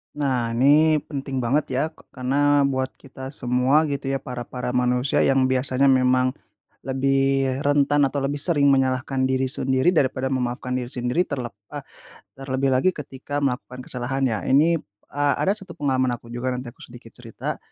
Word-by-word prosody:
Nah 125 -5 -1
ini 150 +4 +4
penting 135 -3 -4
banget 140 +6 +1
ya, 135 - +2
k - - -25 0.2
karena 145 +3 +2
buat 130 -1 0
kita 130 -1 -10
semua 125 +5 +2
gitu 140 -1 -3
ya, 135 0 -1
para 125 -2 -6
para 125 -1 -4
manusia 125 +1 +1
yang 135 -1 +3
biasanya 130 +1 +2
memang 130 0 +3 0.6
lebih 135 0 +1
rentan 145 0 +3
atau 140 +1 -3
lebih 145 +1 -1
sering 145 -3 +3
menyalahkan 130 0 +1
diri 130 0 0
sendiri 130 +3 +1
daripada 130 -5 0
memaafkan 125 -1 -2
diri 125 -1 -4
sendiri. 125 +8 -1
Terlep 125 -5 -4 0.2
eee, - - -5 0.5
terlebih 135 0 -1
lagi 135 +9 +3
ketika 145 -1 -6
melakukan 125 -2 -3
kesalahan 130 +2 -3
ya, 110 -3 -3
ini 155 +5 +4 0.3
eee, 145 0 +1
ada 195 - +2
1 195 -2 -8
pengalaman 130 -3 0
aku 120 -1 -8
juga, 120 +2 -3
nanti 125 0 -5
aku 120 - -12
sedikit 120 -1 -13
cerita. 115 -3 -6
130 Hz, 165 wpm, -23 LUFS, 125-140 Hz, 0.6 s, ini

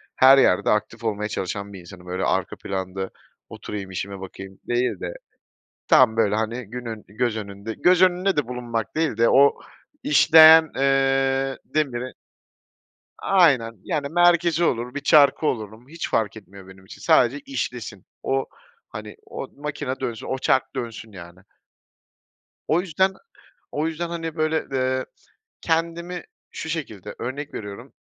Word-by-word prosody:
her 135 +1 +7
yerde 90 -8 +3
aktif 115 +2 -1
olmaya 105 -1 -2
çalışan 100 +1 -4
bir 95 - -9
insanım. 90 +1 -13
Böyle 90 +1 -3
arka - - 0
planda 95 0 -4 0.4
oturayım 100 -2 -7
işime 95 +2 -5
bakayım 95 0 -10
değil 120 +1 0
de, - - -5 0.7
tam 115 -3 +5
böyle, 105 -2 +2
hani, 110 +2 -2
günün, 115 -2 -7
göz 110 +1 -2
önünde 100 +1 -6
göz 180 +6 +3
önünde 185 0 +3
de 145 - 0
bulunmak 120 -1 -4
değil 160 -8 0
de 115 - +4
o 140 +1 +5 0.5
işleyen, 160 - +7
eee, 135 0 +1
demiri 130 -5 -2 1.1
Aynen, 140 -12 +3
yani 150 -5 -2
merkezi 175 -1 +3
olur, 125 -5 0
bir - - -1
çarkı 145 +1 +5
olurum 110 0 -4
hiç 165 +2 -6
fark 110 -1 0
etmiyor 100 -2 -14
benim 95 0 -15
için. - - -13
Sadece 130 +4 +3
işlesin, 120 -7 -5 0.2
o, 135 0 0 0.4
hani, 105 0 -8
o - - -7
makine 145 -2 -4
dönsün, 120 -4 -5
o 130 - -2
çark 130 0 0
dönsün 115 -2 -6
yani. 85 -1 -12 1.3
O 170 +3 +2
yüzden 190 +2 +1 0.6
o 150 +2 -1
yüzden, 165 +1 -4
hani, 165 -1 -5
böyle, 155 0 0
eee, 130 0 0 0.6
kendimi 170 +2 -2 0.3
şu 160 - -6
şekilde 110 - -5
örnek 140 +4 -5
veriyorum, 100 -2 -8
125 Hz, 140 wpm, -23 LUFS, 105-155 Hz, 1.3 s, her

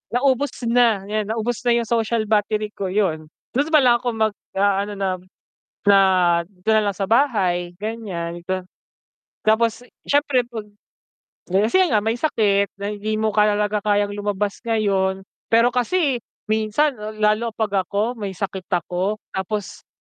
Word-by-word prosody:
Naubos 265 +2 +2 0.2
na, 230 -5 +3
yan 210 +1 -2
naubos 225 +1 -2
na 235 - +5
yung 235 - +1
social 230 -1 0
battery 210 0 0
ko, 195 -3 -4
yun. 180 -6 0 0.2
Dun 285 +5 0
pala 255 -7 +5
ako 245 -2 -2
mag-aano 205 -2 0
na, 190 -2 -2 0.6
na 200 -1 +6 0.5
dito 195 +2 -3
na 220 - +4
lang 200 - -1
sa 195 - -2
bahay, 190 -8 +1
ganyan 190 -5 -5
ta 185 0 -2 0.8
tapos 225 +2 +2 0.2
siyempre 285 -3 +3
'pag 225 -3 -6 0.8
di 185 - -1
kasi 230 - +2
nga 215 -5 +2
may 225 +2 -1
sakit 205 -8 +1
na 200 - -2
hindi 210 +1 -3
mo 220 0 +1
kaya 210 0 +3
laga 210 0 0
kayang 205 -1 +2
lumabas 205 0 -2
ngayon. 195 -4 +1 0.2
Pero 230 +2 +4
kasi, 260 +3 +1 0.3
minsan, 220 +7 +1 0.3
lalo 215 +2 +2
'pag 200 -4 0
ako 220 +5 -1
may 200 -3 -4
sakit 190 -1 -5
ako 180 +4 -1
tapos 190 +1 -4
215 Hz, 145 wpm, -22 LUFS, 200-230 Hz, 0.8 s, na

